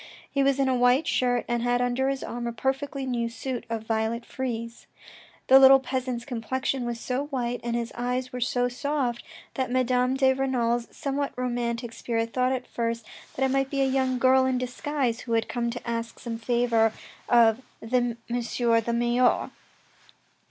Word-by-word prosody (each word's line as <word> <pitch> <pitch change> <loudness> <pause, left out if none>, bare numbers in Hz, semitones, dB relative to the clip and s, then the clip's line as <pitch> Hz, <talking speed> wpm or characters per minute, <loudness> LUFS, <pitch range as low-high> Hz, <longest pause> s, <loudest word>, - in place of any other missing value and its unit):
He 275 - +1
was 275 0 +3
in 270 - +3
a 260 - +2
white 250 +4 +3
shirt 245 -4 +1
and 240 -1 0
had 245 0 +1
under 245 +2 +1
his 275 -1 -2
arm 240 0 -4
a - - -2
perfectly 270 +3 -2
new 240 -2 -1
suit 245 0 -5
of 225 -1 -3
violet 225 +1 -1
frieze. 235 -2 -5 0.6
The 265 +1 +8
little 270 0 +8
peasant's 255 -2 -3
complexion 260 +1 -2
was 235 -1 -3
so 255 +4 -2
white 245 -4 -2
and 235 0 -2
his 235 -1 -2
eyes 250 +1 -2
were 250 - -4
so 245 0 +1
soft, 250 -1 -2 0.3
that 260 -2 -2
Madame 255 0 +2
de 265 -1 +4
Renal's 240 -3 0
somewhat 280 0 -3
romantic 240 -1 -2
spirit 230 -1 -2
thought 255 0 +2
at 255 -1 -2
first 230 -1 -3 0.3
that 265 - +1
it 265 - 0
might 270 0 +1
be 275 -1 -1
a - - +4
young 260 -1 +1
girl 260 +1 +5
in 260 -1 +1
disguise, 250 -1 -2
who 230 - -4
had 225 0 +1
come 235 -1 -2
to 245 +1 -6
ask 230 0 -3
some 230 -2 -5
favour 235 -2 +2 0.4
of 230 0 +5 0.2
the 225 +3 -4
M. 240 -1 0
the 235 -1 0
Mayor. 240 +1 +2
245 Hz, 180 wpm, -26 LUFS, 235-260 Hz, 0.6 s, The